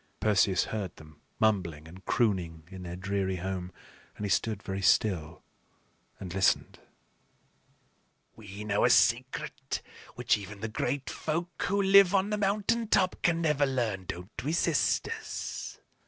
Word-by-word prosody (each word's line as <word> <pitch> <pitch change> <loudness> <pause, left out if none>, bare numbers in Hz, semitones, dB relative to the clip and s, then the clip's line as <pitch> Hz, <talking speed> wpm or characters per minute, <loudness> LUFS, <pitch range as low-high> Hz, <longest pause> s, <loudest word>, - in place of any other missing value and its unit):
Perseus 100 -3 +3
heard 100 -5 -4
them 75 -1 -16 0.2
mumbling 90 -8 0
and 90 +4 -13
crooning 90 -8 0
in 95 0 -8
their 90 -1 -6
dreary 95 0 -1
home, 90 0 -4 0.5
and 105 - -4
he 100 - -2
stood 105 +3 0
very 95 0 -4
still 90 -5 +1 0.8
and 90 -3 -7
listened. 95 0 +1 1.6
"We 105 -1 -9
know 105 -1 +1
a - - +5
secret - - +1 0.3
which - - +2
even 100 0 -9
the 110 - -3
Great 130 +5 -2
Folk 170 +2 -3
who 200 +2 +1
live 195 -1 +6
on 195 +2 +2
the 210 - 0
mountain 210 +3 +1
top 185 -3 +2
can 170 -1 +2
never 150 -3 +2
learn; 115 -8 -1
don't 90 +5 -7
we, 150 +4 -1
sisters?" 445 - -1
105 Hz, 140 wpm, -29 LUFS, -, 1.6 s, live